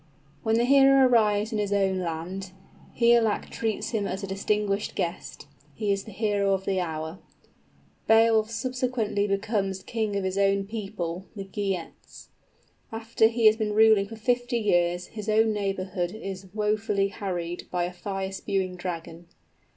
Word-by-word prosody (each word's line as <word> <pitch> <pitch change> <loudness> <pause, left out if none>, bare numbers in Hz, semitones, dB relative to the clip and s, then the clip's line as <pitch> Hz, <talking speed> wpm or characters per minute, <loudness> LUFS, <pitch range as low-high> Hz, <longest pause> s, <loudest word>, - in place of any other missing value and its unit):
_ - - -31 0.4
When 220 0 +1
the 235 +1 +3
hero 275 0 +6
arrives 215 -2 +3
in 215 - -1
his 205 -1 -1
own 195 -2 +2
land, 180 +3 -5 0.5
Higelac 235 -2 +3
treats 220 -2 -2
him 210 -4 -1
as 190 +2 -4
a - - -1
distinguished 200 +1 -1
guest. 170 -3 -4 0.3
He 210 +4 -1
is 195 0 -1
the 220 - -9
hero 200 -1 +1
of 190 0 -6
the 190 -1 0
hour. 160 0 -4 0.9
_Beowulf 225 -1 +5
subsequently 245 -4 -1
becomes 195 -2 -1
king 220 -2 -2
of 200 - -1
his 190 +1 -1
own 195 0 +2
people, 195 -4 -5
the 200 - -5
Geats. 195 -3 -5 0.6
After 225 0 +2
he 230 0 -1
has 215 0 +7
been 215 -2 -1
ruling 220 -2 +5
for 225 - -8
fifty 245 +2 0
years, 175 -4 +1
his 215 -1 -7
own 220 +1 +3
neighborhood 190 -2 -2
is 195 -3 -7
wofully 210 -1 0
harried 175 -4 -4
by 180 -1 -1
a 175 +1 -3
fire 195 +1 -4
spewing 190 -2 -2
dragon. 170 -1 -6
200 Hz, 160 wpm, -26 LUFS, 190-220 Hz, 0.9 s, has